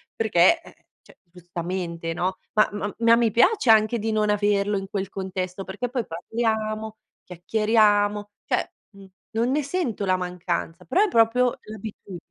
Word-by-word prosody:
perché 220 - +4
eh, - - -16 0.3
cioè, - - -20
giustamente, 175 -1 -5
no. 185 +2 -2 0.2
Ma 215 - +4
ma 205 0 -4
ma 230 0 +6
mi 235 -2 +2
piace 255 - +4
anche 220 +1 +4
di 220 +1 -2
non 215 -1 +1
averlo 205 0 +1
in 195 0 -5
quel 195 -1 -3
contesto 190 -1 -4
perché 205 +6 -4
poi 245 -2 -2
parliamo, 220 +3 -2 0.3
chiacchieriamo 205 +2 +1 0.2
cioè, - - -1 0.2
mhmm, 200 -2 -15 0.2
non 230 +2 0
ne 295 +2 +1
sento 280 - -2
la 185 -1 +2
mancanza, 180 -2 -4
però 375 - +2
è - - +2
proprio 240 -1 +3
l'abitu 215 -3 -9
210 Hz, 155 wpm, -24 LUFS, 185-225 Hz, 0.3 s, ma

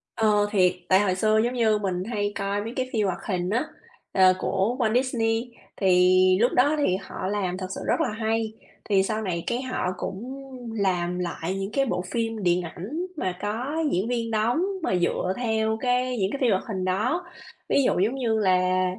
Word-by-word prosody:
Ờ, 210 -2 +3
thiệt, 185 -3 +4 0.2
tại 190 +1 +6
hồi 190 -3 +1
xưa, 215 +2 +2
giống 240 +1 0
như, 220 -3 +3
mình 185 -3 -2
hay 205 -2 -1
coi 200 +1 -1
mấy 230 +2 -6
cái 255 -1 -2
phim 215 -2 +1
hoạt 185 - -2
hình 180 -2 -1
á, 235 +7 +1 0.5
ờ, 185 -1 +6
của 200 +5 0
Walt 220 -2 +2
Disney, 240 -2 0 0.3
thì 185 0 +4
lúc 245 - +4
đó 285 +5 +4
thì 185 -11 +2
họ 185 - -5
làm 190 -3 -1
thật 185 -1 -4
sự - - -6
rất - - +2
là - - +1
hay. 220 0 -1 0.4
Thì 195 -2 +4
sau 215 +2 -2
này 175 -5 -2
cái 240 +1 0
họ 255 -8 -2
cũng 255 +11 -6 0.3
làm 180 -4 0
lại 175 +1 -3
những 195 +2 -4
cái 275 0 +2
bộ 180 - -1
phim 225 -3 -2
điện 175 0 +3
ảnh 220 - -5
mà 185 -6 -2
có 230 +8 -3 0.2
diễn 190 +5 0
viên 230 -2 -2
đóng 225 +8 +1 0.2
mà 185 - +1
dựa 180 +1 0
theo 220 -2 0
cái 250 0 +1
những 195 -2 0
cái 280 - -2
phim 240 -4 +4
hoạt 190 - +1
hình 190 -4 -3
đó. 225 - 0 0.5
Ví 280 - +3
dụ - - +2
giống 220 +7 +1
như 230 -4 0
là 185 -1 +2
210 Hz, 205 wpm, -25 LUFS, 185-235 Hz, 0.5 s, tại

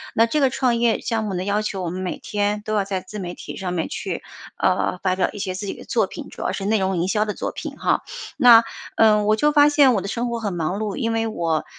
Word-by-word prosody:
那 225 - +5
这 265 +7 0
个 270 -2 +4
创 255 -2 +1
业 235 -1 +2
项 225 -1 -1
目 200 -3 -3
的 180 - -2
要 205 +2 0
求 195 -3 -3
我 175 - -2
们 185 +2 -5
每 185 - -3
天 205 0 -1
都 215 - -2
要 205 - +2
在 190 -1 -3
自 210 +1 -8
媒 175 -2 -5
体 - - -8
上 180 -2 -3
面 165 - -2
去， - - -4 0.3
呃 - - +1
发 185 -1 +2
表 190 - +2
一 - - -8
些 190 -2 -2
自 200 +2 -5
己 - - -3
的 - - -11
作 - - +1
品， - - -9
主 - - -10
要 - - -1
是 195 - -4
内 215 +1 +2
容 190 -1 0
营 170 +2 0
销 210 +1 +1
的 210 - -3
作 - - -4
品 - - -7
哈。 - - +1 0.4
那 240 -4 +8 0.3
嗯 210 -2 +4
我 215 +1 +4
就 295 +7 +2
发 290 -1 +6
现 285 -3 +5
我 205 - 0
的 195 - -5
生 235 +4 -2
活 235 0 -3
很 205 -4 -3
忙 175 +3 -2
碌， 215 -2 -3
因 230 -4 -1
为 225 0 0
我 165 -7 -1
210 Hz, 305 characters per minute, -22 LUFS, 190-230 Hz, 0.4 s, 那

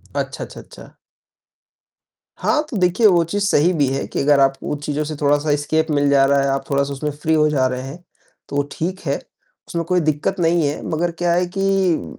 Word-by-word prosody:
अच्छा, - - -3
अच्छा, - - -10
अच्छा। - - -15 1.4
हाँ, 305 -1 +1
तो 245 - -4
देखिए 185 +4 +3
वो 175 -4 +5
चीज़ 200 +5 -2
सही 175 -3 +3
भी 150 -5 +1
है 135 - -2
कि - - -4
अगर 140 0 +4
आप 135 0 +4
उन 150 - -3
चीज़ों 150 +1 -2
से 155 +1 -5
थोड़ा-सा 145 +1 +2
एस्केप 155 +2 0
मिल 145 -1 +2
जा 140 -1 +5
रहा 140 0 +3
है, 140 - 0
आप 135 0 -1
थोड़ा-सा 140 0 0
उसमें 150 +2 -3
फ़्री 150 +2 -1
हो 155 0 +3
जा 135 -3 +2
रहे 130 0 -3
हैं, 140 +7 -9 0.5
तो 145 0 0
ठीक 185 +4 -3
है। 140 - +1 0.5
उसमें 170 -1 -2
कोई 180 +1 +1
दिक़्क़त 155 +4 -1
नहीं 165 -1 +2
है, 145 - -5
मगर 170 +2 0
क्या 175 +1 0
है 180 +1 +2
कि 195 -3 0
155 Hz, 210 wpm, -20 LUFS, 140-175 Hz, 1.4 s, वो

